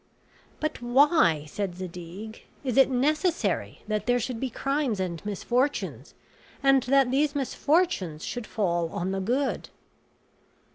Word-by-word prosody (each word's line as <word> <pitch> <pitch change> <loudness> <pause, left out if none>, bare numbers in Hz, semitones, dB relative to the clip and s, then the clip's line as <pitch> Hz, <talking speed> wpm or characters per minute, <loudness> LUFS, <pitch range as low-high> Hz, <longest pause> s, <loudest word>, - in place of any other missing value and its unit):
"But 310 -4 -3
why," 245 - +4
said 190 +3 -3
Zadig, 185 +4 -8 0.2
"is 255 -4 -1
it 270 0 +6
necessary 305 +7 0
that 215 +1 -2
there 245 0 +4
should 240 0 -3
be 265 - -2
crimes 275 -3 -1
and 175 -3 -3
misfortunes, 245 +7 -1 0.5
and 270 -1 +5
that 270 0 +4
these 290 +2 +2
misfortunes 280 - 0
should 245 -3 -5
fall 175 -5 0
on 180 +3 -3
the 195 - -1
good?" 255 +8 -1
245 Hz, 130 wpm, -27 LUFS, 190-275 Hz, 0.5 s, it